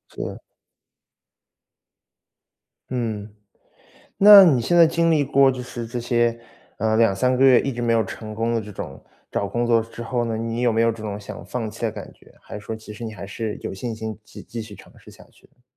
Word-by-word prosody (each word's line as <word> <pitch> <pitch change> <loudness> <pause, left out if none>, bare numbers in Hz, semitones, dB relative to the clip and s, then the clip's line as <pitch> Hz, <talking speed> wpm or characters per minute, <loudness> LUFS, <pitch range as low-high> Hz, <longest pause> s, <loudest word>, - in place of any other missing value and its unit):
是。 - - -6 2.5
嗯。 110 -4 -3 0.9
那 200 -1 +10
你 145 -9 +4
现 175 +9 +1
在 170 -1 +8
经 165 +1 +1
历 150 -3 +3
过 135 0 +4
就 125 -1 -5
是 120 -1 -7
这 120 +1 -5
些， 120 -1 +1 0.4
呃， 110 0 +1
2-3 115 +3 +2
个 130 - +1
月 130 -2 +7
一 135 - -2
直 120 - -6
没 120 -1 +1
有 115 -1 +2
成 110 +2 -8
功 115 +2 -1
的 115 - 0
这 105 -1 -9
种 - - -8 0.3
找 100 - -1
工 120 0 -1
作 115 -1 +3
之 115 +1 -8
后 120 +1 -1
呢， 115 -1 -2
你 115 +1 -3
有 125 -1 +3
没 110 +1 +2
有 115 - +3
这 110 - -10
种 105 -1 -4
想 100 - -9
放 115 -3 -4
弃 110 - -13
的 115 - +1
感 105 - -9
觉？ - - -22
还 - - -11
是 - - -11
说 110 - -4
其 110 -1 -11
实 105 - -11
你 110 - -5
还 100 - -8
是 105 +1 -5
有 - - -5
信 115 +4 -5
心 110 -1 -6
继 - - -12
继 115 - -7
续 110 -2 -9
尝 - - -16
试 - - -16
下 - - -16
去 - - -24
呢？ 125 - -35
115 Hz, 235 characters per minute, -22 LUFS, 110-125 Hz, 2.5 s, 那